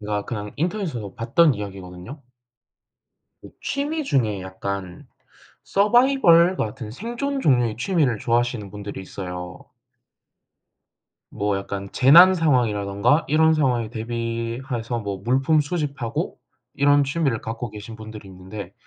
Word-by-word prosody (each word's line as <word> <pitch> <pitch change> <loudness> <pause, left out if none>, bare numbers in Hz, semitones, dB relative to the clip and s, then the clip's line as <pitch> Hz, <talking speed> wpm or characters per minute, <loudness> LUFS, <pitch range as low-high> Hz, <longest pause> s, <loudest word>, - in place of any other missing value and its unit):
제가 105 -1 -3
그냥 105 -3 -5
인터넷에서 160 - -3
봤던 140 +6 +3
이야기거든요. 95 +5 -8 1.2
이 - - -12
취미 300 +3 -2
중에 110 - 0
약간 95 -1 -6 0.5
서바이벌 200 -5 +4
같은 115 0 -4
생존 240 - -4
종류의 120 - +2
취미를 135 - +1
좋아하시는 120 -3 -1
분들이 105 -1 -7
있어요. 90 -1 -7 1.7
뭐 100 -1 -1
약간 100 0 -5
재난 170 +8 +7
상황이라든가 120 - +2
이런 160 +2 +4
상황에 125 -7 +1
대비해서 115 +1 -4
뭐 100 -3 -4
물품 135 +6 +2
수집하고 145 -6 -3 0.4
이런 145 0 +4
취미를 140 -4 0
갖고 115 +1 -5
계신 105 +2 -9
분들이 110 -2 -10
있는데 95 +1 -9
120 Hz, 290 characters per minute, -23 LUFS, 105-150 Hz, 1.7 s, 재난